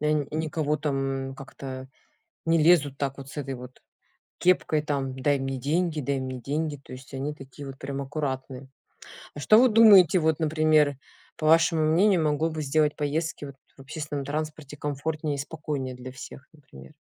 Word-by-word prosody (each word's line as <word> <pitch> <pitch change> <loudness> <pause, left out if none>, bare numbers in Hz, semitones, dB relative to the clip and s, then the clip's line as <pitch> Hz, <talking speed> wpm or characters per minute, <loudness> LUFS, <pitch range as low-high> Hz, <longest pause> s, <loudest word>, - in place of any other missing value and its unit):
э, 150 0 +1
н 150 -2 +1
никого 155 -1 -1
там, 135 -2 -2
как 135 - -11
это, 130 -1 -7 0.6
не 165 0 +3
лезут 155 -4 +4
так 140 -1 -2
вот 135 0 -9
с 150 - -11
этой 135 -2 -3
вот 125 +1 -12 0.6
кепкой, 175 -4 +2
там: 140 -3 -2
"Дай 140 +1 +2
мне 135 0 -3
деньги, 155 +4 0
дай 140 0 -1
мне 130 -1 -5
деньги". 150 +3 -2
То 135 -1 -13
есть 130 +2 -12
они 135 +3 -3
такие 135 0 -11
вот 135 - -9
прям 140 0 -4
аккуратные. 135 -2 -4 0.7
А 145 - -7
что 215 +8 +6
вы 255 +2 +6
думаете 200 -6 +7
вот 160 -2 +1
например, 155 -2 +3 0.4
по 155 - -3
вашему 165 0 +4
мнению, 175 +3 +4
могло 150 +2 +1
бы 155 -1 -4
сделать 150 +1 +1
поездки 150 +1 -2
вот 140 -1 -10 0.2
в - - -17
общественном 145 0 -5
транспорте 150 0 -5
комфортнее 150 +1 -3
и - - -5
спокойнее 145 -3 -4
для 125 +1 -9
всех, 135 +1 -11
например? 70 - -15
145 Hz, 180 wpm, -26 LUFS, 135-155 Hz, 0.7 s, думаете